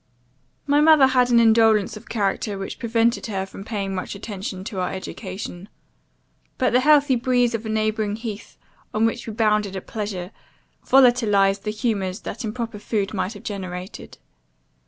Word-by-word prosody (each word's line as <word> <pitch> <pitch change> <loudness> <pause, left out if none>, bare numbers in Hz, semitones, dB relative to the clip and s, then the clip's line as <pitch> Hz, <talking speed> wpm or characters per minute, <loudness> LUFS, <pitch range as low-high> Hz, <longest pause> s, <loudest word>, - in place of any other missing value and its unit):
"My 290 +1 +3
mother 310 -3 +7
had 255 -2 +3
an 235 -1 +5
indolence 225 -2 +4
of 215 +2 -12
character, 205 -1 -1
which 195 - -6
prevented 230 0 +1
her 195 -3 -2
from 195 0 -10
paying 200 -3 -3
much 185 +1 -4
attention 195 -2 -6
to 195 -1 -5
our 180 - -1
education. 190 0 -7 0.9
But 255 - +1
the 250 - +5
healthy 290 -1 +4
breeze 245 -1 +1
of 225 0 -3
a - - -4
neighbouring 215 -1 0
heath, 225 -1 -7 0.4
on 220 +1 +3
which 230 +1 -2
we 220 - -5
bounded 210 -3 +1
at 190 - -6
pleasure, 200 -4 -5 0.5
volatilized 215 -7 +4
the - - -1
humours 210 -3 -2
that 230 +4 -6
improper 225 -1 -4
food 205 -1 -2
might 190 +1 -2
have 205 - -12
generated. 185 -2 -7
215 Hz, 160 wpm, -23 LUFS, 195-235 Hz, 0.9 s, mother